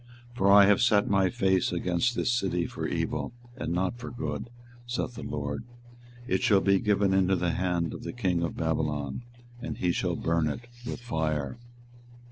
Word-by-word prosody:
24:021:010 120 - -17
For 100 -3 +4
I 100 0 +9
have 100 +2 +4
set 110 -3 +4
my 95 -2 +3
face 95 -5 +1
against 90 +7 0
this 125 - +1
city 95 -7 0
for - - -4
evil, - - -2 0.2
and 125 - -4
not 95 +6 -1
for 120 - -6
good, 120 -1 -4 0.4
saith 120 0 -2
the - - -8
LORD: 70 +2 -4 0.6
it 95 -5 0
shall 100 -3 +5
be 100 0 +3
given 100 -1 +2
into 95 0 +3
the 90 -1 0
hand 90 -2 -1
of - - -7
the - - -5
king 90 -8 0
of 85 - -3
Babylon, 75 - -1 0.4
and 125 - -5
he 90 - +1
shall - - -1
burn 85 -1 +1
it 120 +11 -4 0.2
with 125 - -5
fire. 80 - -2
95 Hz, 185 wpm, -28 LUFS, 85-105 Hz, 0.6 s, I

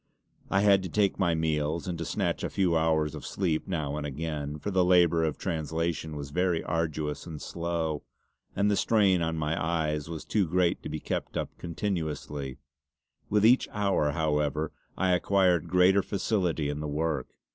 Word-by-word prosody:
I 95 - +3
had 100 -2 +5
to 95 - -5
take 100 +1 +1
my 85 -4 +2
meals, 80 +1 -1
and 90 - -2
to 85 - -3
snatch - - -1
a - - -1
few 90 -4 +1
hours 80 -2 +2
of 75 - -7
sleep 85 -5 -1
now 75 -6 -2
and 75 - -3
again; 75 0 -4
for 100 +7 -4
the 95 -1 +3
labour 85 -2 +4
of 80 -2 -1
translation 80 -1 -2
was 70 -1 -6
very 90 0 +1
arduous 80 -2 -2
and 80 -3 -6
slow, 85 -3 -2 0.5
and 100 +1 +2
the - - +3
strain 100 -5 +3
on 80 0 -1
my 80 +2 -1
eyes 80 -2 -1
was 80 -2 -6
too 100 -5 +1
great 90 +1 +1
to - - -6
be - - -4
kept - - -3
up - - -3
continuously; 80 -7 -3 0.7
with 105 0 +3
each 125 +3 +5
hour, 100 -8 +1
however, 75 0 0 0.3
I 95 0 +2
acquired 90 -2 +2
greater 90 +2 +5
facility 90 -6 -1
in 75 0 -3
the 75 - -3
work. 75 -2 -1
80 Hz, 180 wpm, -28 LUFS, 75-90 Hz, 0.7 s, had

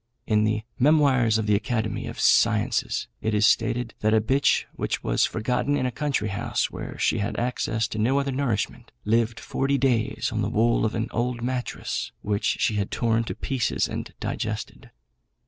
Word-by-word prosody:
In 105 -1 +2
the 110 0 0 0.2
Memoirs 130 -5 +4
of 110 - -1
the 105 - +2
Academy 110 +2 -1
of - - -7
Sciences - - +2
it 110 0 0
is 105 0 +4
stated, 115 +1 +1
that 110 +1 +2
a - - +5
bitch 130 +6 +2
which - - -3
was - - +2
forgotten 125 +6 0
in 130 - 0
a 125 - 0
country 130 -4 -1
house, 100 +1 -1
where - - -7
she 115 - +1
had 100 - -2
access 115 -2 -1
to 110 - -4
no 130 +6 +2
other 140 0 -1
nourishment, 120 -3 -2
lived 115 +1 +1
forty 140 +1 0
days 125 -4 0
on - - -1
the - - 0
wool 115 +1 +2
of 110 - -1
an 110 0 -1
old 120 +1 -2
mattress 125 0 -3
which 105 -1 0
she 105 - +1
had 100 -1 -1
torn 115 -1 +1
to - - -5
pieces 130 -4 -1
and - - -5
digested. - - -4
115 Hz, 180 wpm, -25 LUFS, 110-125 Hz, 0.2 s, a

